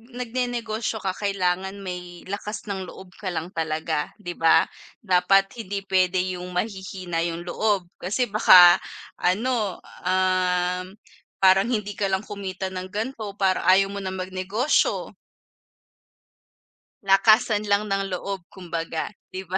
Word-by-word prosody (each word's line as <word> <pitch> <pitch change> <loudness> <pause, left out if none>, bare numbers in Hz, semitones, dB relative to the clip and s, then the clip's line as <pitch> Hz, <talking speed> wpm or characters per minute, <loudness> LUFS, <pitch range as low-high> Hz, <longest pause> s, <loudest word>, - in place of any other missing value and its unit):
nag-nenegosyo 235 -3 -3
ka 190 - 0
kailangan 190 -1 -1
may 180 -1 -7
lakas 210 +2 -5
ng 190 -1 -4
loob 190 0 -11
ka 200 - -6
lang 165 +1 -3
talaga 155 -2 -2
di 175 - -5
ba? 165 0 +5 0.4
Dapat 195 +2 +3
hindi 200 -2 -4
pwede 185 -1 +3 0.2
yung 180 0 -8
mahihina 185 -3 -3
yung 170 0 -5
loob 200 0 0
kasi 210 +7 -1
baka 180 -4 +8 0.4
ano, 210 +1 0 0.2
um, 185 0 +1 0.5
parang 190 +2 +6
hindi 210 -4 -2
ka 205 - +1
lang 190 0 0
kumita 190 -2 -5
ng 185 0 -5
ganito 215 -1 -4
parang 190 -2 +1
ayaw 195 +1 +5
mo 200 - -5
na 190 -1 -4
mag-negosyo. 190 +8 0 1.9
Lakasan 210 +2 +4
lang 205 +1 +1
ng 195 -1 -1
loob 190 0 -4
kumbaga. 165 -3 -4 0.2
Di 185 - -4
ba? 190 0 -3
190 Hz, 130 wpm, -24 LUFS, 180-205 Hz, 1.9 s, baka